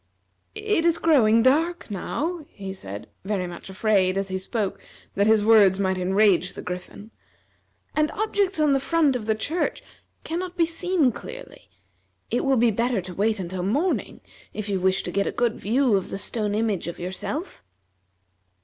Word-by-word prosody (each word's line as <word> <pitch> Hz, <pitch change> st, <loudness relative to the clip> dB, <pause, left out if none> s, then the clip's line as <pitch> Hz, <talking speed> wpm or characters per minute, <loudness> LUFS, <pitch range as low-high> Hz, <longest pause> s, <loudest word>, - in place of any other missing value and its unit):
"It 425 Hz, -5 st, 0 dB
is 335 Hz, -1 st, +3 dB
growing 230 Hz, -8 st, +4 dB
dark, 320 Hz, +2 st, +2 dB
now," 315 Hz, -, -3 dB
he 195 Hz, -2 st, -7 dB
said, 100 Hz, -, -7 dB, 0.2 s
very 190 Hz, -2 st, -1 dB
much 175 Hz, +1 st, -9 dB
afraid, 190 Hz, -1 st, +2 dB
as 195 Hz, 0 st, -1 dB
he 190 Hz, 0 st, -2 dB
spoke, 200 Hz, +1 st, -2 dB, 0.3 s
that 200 Hz, +1 st, +2 dB
his 220 Hz, -1 st, +4 dB
words 205 Hz, -4 st, +6 dB
might 190 Hz, -1 st, 0 dB
enrage 190 Hz, -1 st, +3 dB
the -, -, -8 dB
Griffin, 180 Hz, +4 st, -7 dB, 0.8 s
"and 305 Hz, 0 st, +2 dB
objects 405 Hz, -4 st, 0 dB
on 300 Hz, -2 st, +4 dB
the 270 Hz, -, +3 dB
front 300 Hz, -1 st, +2 dB
of 225 Hz, -3 st, -4 dB
the 220 Hz, -, +2 dB
church 315 Hz, +11 st, -2 dB, 0.4 s
can 330 Hz, +2 st, -3 dB
not 365 Hz, 0 st, -6 dB
be 335 Hz, -, +4 dB
seen 335 Hz, -4 st, +1 dB
clearly. -, -, -10 dB, 0.6 s
It -, -, +1 dB
will 270 Hz, -1 st, +3 dB
be 235 Hz, 0 st, +4 dB
better 235 Hz, +1 st, 0 dB
to 180 Hz, 0 st, -7 dB
wait 215 Hz, +3 st, 0 dB
until 185 Hz, 0 st, -4 dB
morning, 280 Hz, -, -1 dB, 0.3 s
if 215 Hz, -1 st, -4 dB
you 195 Hz, -2 st, 0 dB
wish 190 Hz, +1 st, +1 dB
to 175 Hz, -, -4 dB
get 200 Hz, +2 st, 0 dB
a -, -, 0 dB
good 240 Hz, -2 st, 0 dB
view 240 Hz, +2 st, +2 dB
of 190 Hz, -, -1 dB
the -, -, -4 dB
stone 210 Hz, 0 st, -2 dB
image 215 Hz, -6 st, -1 dB
of 170 Hz, -, -5 dB
yourself." 190 Hz, -, -5 dB
215 Hz, 175 wpm, -24 LUFS, 190-305 Hz, 0.8 s, words